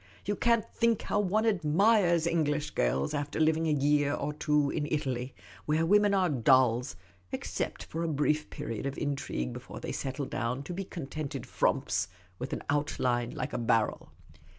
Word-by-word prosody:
You 205 - 0
can't 235 +1 +2
think 230 -2 +1
how - - 0
one 210 +2 +1
admires 180 -1 +3
English 150 -3 0
girls 65 +3 0
after 145 +1 -2
living 160 +1 +3
a - - +2
year 145 0 +2
or 150 +1 -3
two 150 -2 +1
in 150 -2 -2
Italy 130 -4 -2
— - - -20
where 155 +2 +2
women 205 +2 +4
are 185 -2 +3
dolls, 130 -2 +3 0.4
except - - -3
for 165 - -5
a 170 - 0
brief 150 0 0
period 140 -5 -4
of 140 - -4
intrigue, 135 - -2
before - - -8
they - - -5
settle 135 +1 -3
down 125 +2 -2
to 175 - -6
be 195 +2 -4
contented 155 -4 -5
frumps - - 0 0.3
with 125 - -5
an - - -4
out 145 +1 0
line 120 -1 +1
like - - -5
a - - -1
barrel." 115 -2 0
150 Hz, 175 wpm, -30 LUFS, 135-170 Hz, 0.4 s, women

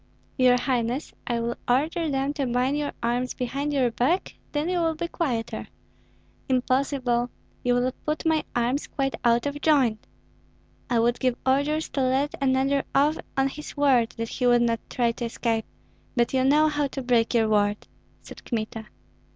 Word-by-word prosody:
"Your 250 -2 +5
highness, 245 +1 -1
I 235 -1 0
will 235 +1 -2
order 310 +6 +1
them 275 0 0
to 280 -3 -2
bind 250 +3 +1
your 295 -1 -1
arms 245 +2 0
behind 275 +4 -2
your 260 -4 +2
back; 290 +11 0 0.2
then 295 +2 -1
you 360 0 0
will 325 -1 +1
be 340 +2 -3
quieter." 255 -10 -3 0.8
"Impossible! 255 -1 +1 0.3
You 245 0 +2
will 250 +1 +1 0.2
put 305 +2 -1
my 320 -1 +2
arms 245 +4 0
quite 270 -2 -2
out 235 +1 +3
of 285 0 -3
joint." 265 -8 +2 0.8
"I 240 - +2
would 235 +1 +2
give 255 -2 +1
orders 285 +4 +1
to 275 - -2
let 265 +3 +1
another 270 +1 +2
off 295 +3 +3 0.2
on 270 0 +3
his 300 +2 -9
word 260 -5 +3
that 230 0 -3
he 250 - 0
would 240 -1 +5
not 230 -1 +1
try 240 -2 +1
to 235 +1 -5
escape, 230 -1 -1 0.5
but 240 0 +1
you 260 -1 +2
know 300 +3 +5
how 295 -1 0
to 270 0 -6
break 240 -1 +2
your 225 -2 +4
word," 205 -1 +1 0.4
said - - -12
Kmita. 220 -1 -4
255 Hz, 175 wpm, -25 LUFS, 240-285 Hz, 0.8 s, Your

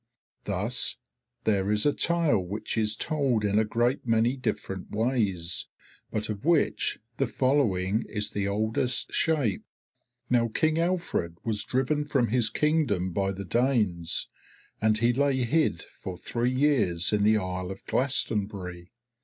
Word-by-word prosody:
Thus 105 +5 0 0.5
there 100 -2 +1
is 105 0 +2
a 145 - +4
tale 170 -9 +2
which 100 +4 -4
is 110 -1 +1
told 135 -9 0
in 105 +1 +2
a - - +4
great 120 +4 0
many 115 +2 +2
different 95 -7 -4
ways, 105 -7 0 0.4
but 110 0 -2
of 105 -1 -5
which 165 0 +2 0.2
the 135 - +1
following 115 -7 +1
is 105 -1 -2
the 100 -1 -1
oldest 110 +4 0
shape. 145 - +1 0.6
"Now 120 -1 +3
King 155 +6 +1
Alfred 170 - -1
was 110 -3 -1
driven 135 +4 0
from 135 -5 +1
his 120 -1 +2
Kingdom 145 - +1
by 95 +1 0
the 100 +1 -6
Danes, 105 -6 +1 0.5
and 110 0 +3
he 120 +2 +2
lay 135 0 +1
hid 155 +7 +1
for 95 -2 -7
three 120 +6 -1
years 130 - +2
in 105 - +2
the 110 +1 +5
isle 90 -2 -3
of 95 - -8
Glastonbury. 100 -9 -1
110 Hz, 145 wpm, -27 LUFS, 100-130 Hz, 0.6 s, the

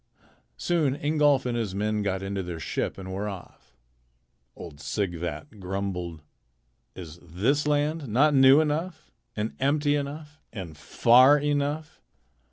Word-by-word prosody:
Soon 155 -6 0
Ingolf 145 -2 +2
and 120 -1 -1
his 110 -5 -3
men 105 +1 -1
got 95 -1 -2
into 95 0 -3
their 90 -2 -6
ship - - -3
and 95 -1 -7
were 100 +2 -3
off. 90 -9 -12 0.8
Old 75 -4 -10
Sighvat 90 - -4
grumbled. 90 -4 -4 0.7
"Is 85 -2 -10
this 115 - 0
land 150 0 0
not 140 +7 +3
new 135 +2 +7
enough 160 +3 -3 0.2
and 105 +1 -3
empty 145 +2 +2
enough 145 +1 -6
and 90 -8 -8
far 120 - +5
enough? 145 +1 -2
120 Hz, 130 wpm, -26 LUFS, 95-145 Hz, 0.8 s, new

